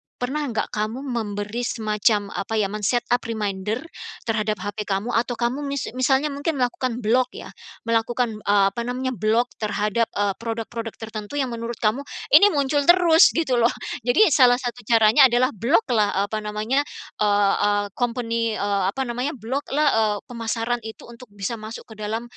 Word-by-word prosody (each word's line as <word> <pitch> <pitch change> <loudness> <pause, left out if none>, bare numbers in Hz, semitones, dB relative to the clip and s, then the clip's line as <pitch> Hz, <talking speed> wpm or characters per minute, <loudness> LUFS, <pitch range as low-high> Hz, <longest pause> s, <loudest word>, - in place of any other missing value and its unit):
pernah 285 +4 -2
nggak 225 -3 -2
kamu 215 +5 -3
memberi 210 0 -3
semacam 215 -3 0
apa 225 +3 -4
ya, 205 -2 +1
men-set 215 +3 0
up 245 - +4
reminder 210 +2 -3 0.4
terhadap 215 -2 -1
HP 205 0 -4
kamu 200 +4 -1
atau 240 +1 0
kamu 240 +4 -1
mis 280 -1 -3
misalnya 265 +4 +1
mungkin 285 +2 -2
melakukan 250 -1 -2
block 250 +4 +1
ya, - - -9 0.3
melakukan, 230 0 0
eee, 200 -1 +3
apa 235 - -4
namanya, 255 +1 -2
block 230 +2 +1
terhadap, 215 +1 0
eee, 205 -1 +1
produk-produk 230 0 -5
tertentu 220 +3 -7
yang 265 -3 -1
menurut 235 0 -5
kamu 215 +5 +2 0.3
ini 410 - +8
muncul 285 -3 0
terus 345 -1 +7
gitu 265 -7 +1
loh. 235 +1 +4 0.4
Jadi 330 - +5
salah 250 -2 +6
satu 245 -3 -6
caranya 230 +4 +6
adalah 250 +2 +2
block-lah, 230 - +1
eee, - - 0
apa 215 - -1
namanya, 215 +5 -1 0.4
eee 205 -1 +3
eee, 205 0 +2
company, 230 -1 -1
eee, 200 -1 0
apa 270 - -1
namanya, 250 +4 -3
block-lah, 275 +5 -1
eee, 210 -1 +1
pemasaran 230 +1 -2
itu 220 - -10
untuk 240 +2 -13
bisa 210 +3 -4
masuk 215 +1 -8
ke 215 - -12
dalam, 220 +2 -3
230 Hz, 165 wpm, -23 LUFS, 215-255 Hz, 0.4 s, ini